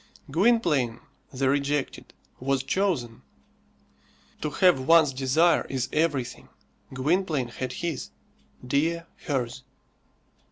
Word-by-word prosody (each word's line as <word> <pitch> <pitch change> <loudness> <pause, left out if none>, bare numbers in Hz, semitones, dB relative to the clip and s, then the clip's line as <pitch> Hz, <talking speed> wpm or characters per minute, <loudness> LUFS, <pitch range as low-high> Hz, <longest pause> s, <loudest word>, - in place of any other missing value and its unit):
Gwynplaine 160 - +2 0.3
the 135 0 -1
rejected 140 +1 -1 0.3
was 135 0 0
chosen. 135 - -1 1.2
To 150 - -1
have 180 +1 +4
one's 155 +1 +5
desire 135 +6 +2
is 130 -2 -2
everything. 150 -6 -1 0.4
Gwynplaine 150 -1 0
had 130 +1 -5
his, 160 -1 -4 0.6
Dea 160 +6 +1 0.2
hers. 130 -3 -2
140 Hz, 90 wpm, -26 LUFS, 130-165 Hz, 1.2 s, one's